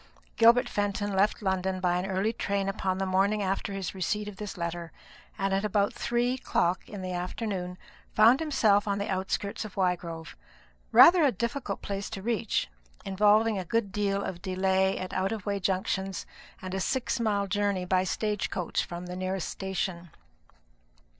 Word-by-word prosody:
Gilbert 235 Hz, +2 st, +6 dB
Fenton 205 Hz, -1 st, -1 dB
left 205 Hz, +2 st, +2 dB
London 190 Hz, -1 st, 0 dB
by 180 Hz, -1 st, +1 dB
an 185 Hz, -, -3 dB
early 195 Hz, +4 st, 0 dB
train 200 Hz, -3 st, -1 dB
upon 190 Hz, -1 st, -1 dB
the 195 Hz, -, -1 dB
morning 195 Hz, +3 st, +2 dB
after 195 Hz, +2 st, -1 dB
his 195 Hz, -2 st, -4 dB
receipt 210 Hz, +3 st, -2 dB
of 205 Hz, -2 st, -8 dB
this 210 Hz, -2 st, -6 dB
letter; 170 Hz, -1 st, -4 dB, 0.5 s
and 195 Hz, 0 st, 0 dB
at 195 Hz, +1 st, +1 dB
about 205 Hz, -1 st, +1 dB
three 240 Hz, +1 st, 0 dB
o'clock 185 Hz, -8 st, 0 dB
in 200 Hz, -3 st, -7 dB
the 185 Hz, 0 st, -3 dB
afternoon 180 Hz, 0 st, -3 dB, 0.4 s
found 230 Hz, +5 st, +6 dB
himself 215 Hz, -10 st, +3 dB
on 200 Hz, 0 st, 0 dB
the 200 Hz, +1 st, -2 dB
outskirts 195 Hz, +2 st, -2 dB
of 215 Hz, -3 st, -9 dB
Wygrove, 170 Hz, -3 st, -2 dB, 0.6 s
rather 350 Hz, +1 st, +8 dB
a 280 Hz, -, +5 dB
difficult 235 Hz, 0 st, -3 dB
place 200 Hz, 0 st, -4 dB
to 195 Hz, -3 st, -6 dB
reach, 230 Hz, -1 st, 0 dB, 0.4 s
involving 210 Hz, +2 st, +3 dB
a -, -, -3 dB
good 205 Hz, +2 st, -1 dB
deal 200 Hz, -1 st, 0 dB
of 175 Hz, -2 st, -5 dB
delay 190 Hz, +1 st, +1 dB
at 185 Hz, -, -5 dB
out 190 Hz, +1 st, 0 dB
of 220 Hz, -3 st, -4 dB
the -, -, -3 dB
way 200 Hz, 0 st, 0 dB
junctions, 190 Hz, 0 st, -1 dB, 0.4 s
and 185 Hz, 0 st, -5 dB
a 190 Hz, -, -1 dB
six 260 Hz, +5 st, -1 dB
mile 205 Hz, -3 st, +1 dB
journey 200 Hz, -1 st, 0 dB
by 185 Hz, 0 st, +2 dB
stage 210 Hz, +2 st, -1 dB
coach 180 Hz, -3 st, -1 dB
from 175 Hz, +1 st, -7 dB
the 180 Hz, 0 st, -6 dB
nearest 185 Hz, 0 st, -2 dB
station. 185 Hz, -2 st, -3 dB
195 Hz, 175 wpm, -28 LUFS, 185-210 Hz, 0.6 s, rather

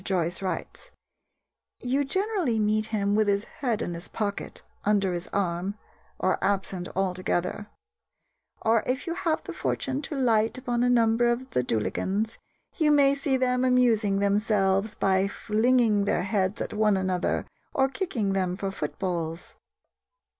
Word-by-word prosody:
Joyce 175 Hz, -3 st, -1 dB
writes: 195 Hz, -, -5 dB, 0.9 s
"You 265 Hz, +3 st, 0 dB
generally 375 Hz, -, 0 dB
meet 215 Hz, 0 st, +1 dB
him 205 Hz, -2 st, 0 dB
with 215 Hz, 0 st, +3 dB
his 200 Hz, 0 st, +2 dB, 0.2 s
head 240 Hz, -7 st, 0 dB
in 175 Hz, -, -3 dB
his 170 Hz, +1 st, -7 dB
pocket, 205 Hz, -2 st, -4 dB, 0.2 s
under 200 Hz, -3 st, +2 dB
his 175 Hz, 0 st, -4 dB
arm, 185 Hz, 0 st, -1 dB, 0.4 s
or 185 Hz, -, 0 dB
absent 190 Hz, -2 st, -1 dB
altogether; 185 Hz, +1 st, -1 dB, 1.0 s
or 225 Hz, 0 st, +4 dB
if 255 Hz, +2 st, -1 dB
you 335 Hz, -, -2 dB
have 330 Hz, -2 st, -1 dB
the -, -, -7 dB
fortune 270 Hz, +1 st, -2 dB
to 300 Hz, +1 st, -5 dB
light 230 Hz, -4 st, +2 dB
upon 245 Hz, -2 st, -1 dB
a 245 Hz, -, +3 dB
number 235 Hz, 0 st, +3 dB
of 240 Hz, +2 st, -1 dB
Dullaghans, 190 Hz, -, -1 dB, 0.4 s
you 310 Hz, -4 st, +3 dB
may 280 Hz, -1 st, +5 dB
see 280 Hz, -1 st, 0 dB
them 250 Hz, 0 st, +1 dB
amusing 235 Hz, -6 st, +3 dB
themselves 200 Hz, 0 st, +1 dB
by 190 Hz, 0 st, +2 dB
flinging 220 Hz, 0 st, +2 dB
their 175 Hz, -, +1 dB
heads 195 Hz, 0 st, 0 dB
at -, -, -4 dB
one 210 Hz, -2 st, +3 dB
another 185 Hz, -1 st, 0 dB, 0.3 s
or 265 Hz, 0 st, +2 dB
kicking 265 Hz, -, -2 dB
them 185 Hz, -2 st, 0 dB
for 195 Hz, -1 st, -3 dB
footballs." 165 Hz, 0 st, -4 dB
210 Hz, 145 wpm, -27 LUFS, 190-250 Hz, 1.0 s, may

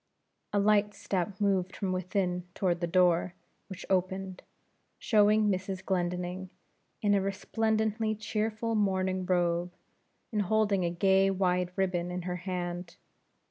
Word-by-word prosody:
A -, -, 0 dB
light 205 Hz, 0 st, +3 dB
step 190 Hz, +1 st, -3 dB
moved 195 Hz, -3 st, +1 dB
from 195 Hz, -3 st, -2 dB
within 185 Hz, -1 st, -1 dB
toward 175 Hz, -2 st, 0 dB
the 170 Hz, -, 0 dB
door; 175 Hz, 0 st, +3 dB, 0.3 s
which 190 Hz, -4 st, -8 dB
opened, 190 Hz, 0 st, -1 dB, 0.6 s
showing 215 Hz, -1 st, +4 dB
Mrs. 190 Hz, 0 st, -3 dB
Glendinning, 180 Hz, 0 st, -2 dB, 0.5 s
in 205 Hz, -1 st, +4 dB
a 200 Hz, -, +3 dB
resplendently 220 Hz, +2 st, 0 dB
cheerful 215 Hz, +1 st, -2 dB
morning 190 Hz, -3 st, 0 dB
robe, 175 Hz, -1 st, +1 dB, 0.6 s
and 210 Hz, -2 st, +1 dB
holding 205 Hz, -1 st, +2 dB
a 170 Hz, -, +1 dB
gay 190 Hz, +2 st, +3 dB
wide 180 Hz, -2 st, +1 dB
ribbon 180 Hz, -2 st, 0 dB
in 180 Hz, 0 st, -4 dB
her 180 Hz, 0 st, -3 dB
hand. 175 Hz, -1 st, -4 dB
190 Hz, 130 wpm, -30 LUFS, 180-205 Hz, 0.6 s, showing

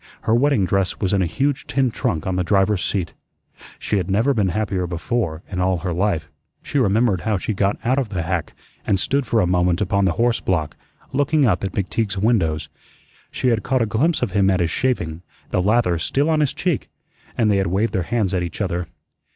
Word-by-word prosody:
Her 110 Hz, 0 st, +1 dB
wedding 125 Hz, -4 st, +3 dB
dress 95 Hz, 0 st, 0 dB
was 95 Hz, -2 st, 0 dB
in 100 Hz, -, +3 dB
a 90 Hz, -, +1 dB
huge 140 Hz, -, -1 dB
tin 135 Hz, -3 st, +1 dB
trunk 80 Hz, -7 st, -2 dB
on 95 Hz, -, -1 dB
the 90 Hz, -, +1 dB
driver's 95 Hz, +1 st, +2 dB
seat. 90 Hz, -5 st, -2 dB, 0.6 s
She 105 Hz, -, -1 dB
had 95 Hz, -1 st, -2 dB
never 115 Hz, +9 st, +2 dB
been 105 Hz, -6 st, +1 dB
happier 95 Hz, -2 st, -1 dB
before 85 Hz, -1 st, -2 dB
in 90 Hz, -, -5 dB
all 90 Hz, 0 st, +2 dB
her 90 Hz, 0 st, -3 dB
life. 90 Hz, -3 st, 0 dB, 0.4 s
She 145 Hz, -, -1 dB
remembered 105 Hz, -4 st, +2 dB
how 110 Hz, -2 st, 0 dB
she 110 Hz, -, -2 dB
got 100 Hz, 0 st, 0 dB
out 130 Hz, +3 st, +2 dB
of 125 Hz, -5 st, -2 dB
the 90 Hz, -5 st, -2 dB
hack 90 Hz, -1 st, -2 dB, 0.3 s
and 95 Hz, -, +1 dB
stood 140 Hz, +6 st, 0 dB
for 115 Hz, -, +2 dB
a -, -, +2 dB
moment 90 Hz, -1 st, +2 dB
upon 100 Hz, 0 st, +1 dB
the 90 Hz, -, +2 dB
horse 120 Hz, +4 st, +1 dB
block, 80 Hz, -5 st, -1 dB, 0.4 s
looking 145 Hz, +1 st, +2 dB
up 100 Hz, -6 st, +1 dB
at 95 Hz, -, -3 dB
McTeague's 100 Hz, +1 st, -1 dB
windows. 95 Hz, -8 st, +1 dB, 0.6 s
She 130 Hz, -, 0 dB
had 115 Hz, -2 st, +1 dB
caught 130 Hz, -2 st, +1 dB
a -, -, +1 dB
glimpse 135 Hz, +10 st, +1 dB
of -, -, -1 dB
him 100 Hz, 0 st, +3 dB
at 95 Hz, 0 st, +2 dB
his 85 Hz, -1 st, 0 dB
shaving, 85 Hz, -12 st, -1 dB, 0.3 s
the -, -, +1 dB
lather 95 Hz, -4 st, +2 dB
still 140 Hz, -, +1 dB
on 155 Hz, -, +2 dB
his 150 Hz, -3 st, +1 dB
cheek, 175 Hz, -6 st, -1 dB, 0.5 s
and 110 Hz, -3 st, +3 dB
they 100 Hz, -, +3 dB
had 95 Hz, -2 st, +1 dB
waved 100 Hz, +6 st, 0 dB
their 95 Hz, -, +1 dB
hands 100 Hz, +1 st, -1 dB
at 90 Hz, -, +1 dB
each 85 Hz, -2 st, -5 dB
other. 90 Hz, -4 st, -2 dB
100 Hz, 220 wpm, -21 LUFS, 90-120 Hz, 0.6 s, wedding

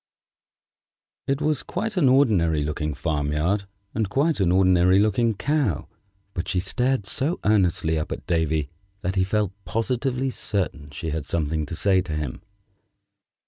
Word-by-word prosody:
It 135 Hz, +2 st, 0 dB
was 150 Hz, -1 st, +1 dB
quite 215 Hz, +4 st, -3 dB
an 155 Hz, -8 st, +4 dB
ordinary 95 Hz, -, +3 dB
looking 75 Hz, 0 st, -2 dB
farm 75 Hz, -1 st, -1 dB
yard 95 Hz, +7 st, 0 dB, 0.3 s
and 110 Hz, -3 st, -1 dB
quite 145 Hz, +6 st, +1 dB
an 90 Hz, -3 st, +3 dB
ordinary 90 Hz, 0 st, +4 dB
looking 110 Hz, +2 st, +2 dB
Cow, 130 Hz, -, 0 dB, 0.5 s
but 90 Hz, +1 st, -3 dB
she 95 Hz, -, 0 dB
stared 125 Hz, +4 st, 0 dB
so 140 Hz, -, 0 dB
earnestly 90 Hz, -6 st, +2 dB
up 75 Hz, -, -4 dB
at -, -, -5 dB
Davy 80 Hz, -3 st, 0 dB, 0.3 s
that 90 Hz, -, -1 dB
he 95 Hz, -1 st, +2 dB
felt 105 Hz, 0 st, 0 dB
positively 125 Hz, +5 st, -1 dB
certain 80 Hz, -, -2 dB
she 80 Hz, +2 st, -5 dB
had 75 Hz, -1 st, -3 dB
something 80 Hz, -2 st, -1 dB
to 80 Hz, -, -5 dB
say 95 Hz, +1 st, +3 dB
to 90 Hz, -4 st, -5 dB
him. 75 Hz, -4 st, -4 dB
95 Hz, 150 wpm, -24 LUFS, 80-120 Hz, 0.5 s, an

